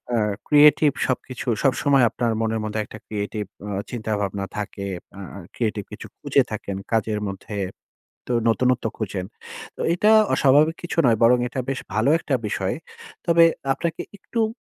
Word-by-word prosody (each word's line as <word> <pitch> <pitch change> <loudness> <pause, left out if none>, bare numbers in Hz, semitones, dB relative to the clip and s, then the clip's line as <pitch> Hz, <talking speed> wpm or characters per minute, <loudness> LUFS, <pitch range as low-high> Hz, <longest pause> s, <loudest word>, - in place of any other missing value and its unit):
আ - - +2 0.3
creative 150 0 +6
সবকিছু 130 0 -4 0.2
সবসময় 135 0 +3
আপনার 120 0 -1
মনের 110 0 0
মধ্যে 110 0 -3
একটা - - -10
creative 105 -1 -4 0.2
উম 100 -1 -3
চিন্তাভাবনা 105 -4 -2
থাকে। 100 -1 -4 0.3
আ - - -7
আ 100 - -7 0.2
creative 105 -4 -2
কিছু - - -8
খুঁজে - - +2
থাকেন 100 - -4 0.2
কাজের 110 -1 +1
মধ্যে 100 +2 -7 0.7
তো - - +2
নতুনত্ব 125 +1 +1
খুঁজেন। 95 -4 -3 0.5
তো - - -7
এইটা 210 +5 +3 0.2
অস্বাভাবিক 150 +4 +4
কিছু 175 - -5
নয়। 115 -3 +4
বরং 120 +2 +6
এটা 125 +2 -5
বেশ 135 - -2
ভালো 110 +5 +2
একটা 145 - -1
বিষয়। 95 -2 -1 0.5
তবে 170 -1 +5 0.3
আপনাকে 165 +2 -3 0.2
একটু 230 +4 -5
ম 220 - -5
115 Hz, 155 wpm, -23 LUFS, 105-140 Hz, 0.7 s, creative